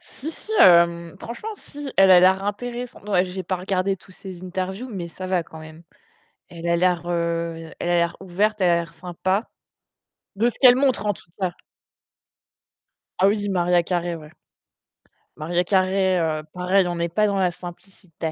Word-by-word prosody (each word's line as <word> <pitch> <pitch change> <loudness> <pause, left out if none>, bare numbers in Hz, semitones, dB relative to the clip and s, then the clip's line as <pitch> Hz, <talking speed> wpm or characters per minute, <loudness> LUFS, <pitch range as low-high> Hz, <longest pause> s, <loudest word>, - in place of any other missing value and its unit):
Si 300 +4 -7
si, 435 - -9
hem, 170 -2 +5
franchement, 240 - -7
si, 290 -7 -9
elle 195 0 +6
a 180 -1 +9
l'air 190 +1 +4
intéressante, 240 +1 -5
ouais, 185 -3 +3
j'ai 185 0 -5
pas 185 +1 -2
regardé 190 +1 -1
toutes 185 0 -16
ses 185 -2 -10
interviews, 190 +6 -4
mais 180 -5 -5
ça 185 +2 -8
va 185 -2 +1
quand 160 0 -13
même. 155 +1 -12 0.7
Elle 170 -1 -8
a 170 - +3
l'air, 175 -1 +1
heu, 170 -1 -2
elle - - -3
a - - +3
l'air 170 0 0
ouverte, 205 +3 0
elle 180 -2 +4
a - - +5
l'air 170 -1 -4
sympa 185 +5 -2 0.9
de 230 +4 +2
ce - - -11
qu'elle 250 -2 +8
montre, 260 -5 +1
en 205 - +2
tout 175 - -18
cas. 180 -2 -1 1.6
Ah 190 - +5
oui, 205 0 0
Mariah 175 -2 +2
Carey, 175 0 -2
ouais. 155 -2 -11 1.1
Mariah 175 +3 0
Carey, 190 0 +2
heu, 155 -2 -1
pareil, 180 +1 +2
on 175 - -2
n'est 170 0 -1
pas 210 +5 +2
dans 200 -1 0
la 180 -2 +2
simplicité! 175 -2 -8
185 Hz, 180 wpm, -23 LUFS, 170-195 Hz, 1.6 s, a